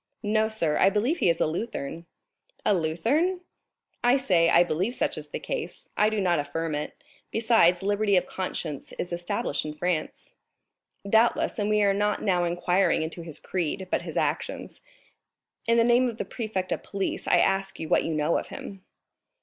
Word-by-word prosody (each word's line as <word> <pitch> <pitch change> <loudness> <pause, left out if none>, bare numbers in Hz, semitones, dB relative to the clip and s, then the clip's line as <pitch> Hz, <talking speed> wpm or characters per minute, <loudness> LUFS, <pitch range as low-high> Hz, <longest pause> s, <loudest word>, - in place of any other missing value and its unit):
"No, 215 +1 +2
sir; 170 -9 0
I - - +6
believe 235 - 0
he - - +3
is 165 - +1
a - - +3
Lutheran." 170 -2 -4 0.6
"A 210 - +4
Lutheran?" 235 - +1 0.6
"I 245 +2 +5
say, 175 -10 +3
I 170 - +6
believe 180 +8 -1
such - - 0
is - - -8
the - - -5
case, 475 -3 -5
I 210 - +4
do 220 -1 -1
not 175 -4 +2
affirm 155 +3 -3
it; 150 0 -5 0.3
besides, 220 -6 +3
liberty 205 0 +2
of 180 - +3
conscience 165 -6 -5
is 175 - -4
established 175 -4 -2
in 150 0 -6
France." 170 0 -3 0.7
"Doubtless, 225 +2 +2
and 205 0 0
we 210 0 +3
are 200 -1 +4
not 210 +1 0
now 180 -4 +2
inquiring 175 +1 +1
into 165 +2 -5
his 160 -3 -7
creed, 185 +1 -3
but - - +1
his - - -6
actions; - - -2 0.9
in 230 0 +4
the 230 - +5
name 245 +2 +4
of 225 - -7
the - - -3
prefect 210 -6 -4
of - - -1
police, 195 -1 -3
I - - +5
ask 195 0 +1
you 160 - -4
what - - +3
you 165 - -2
know 155 +2 +1
of - - -8
him. 195 -2 -9
190 Hz, 185 wpm, -26 LUFS, 170-220 Hz, 0.9 s, I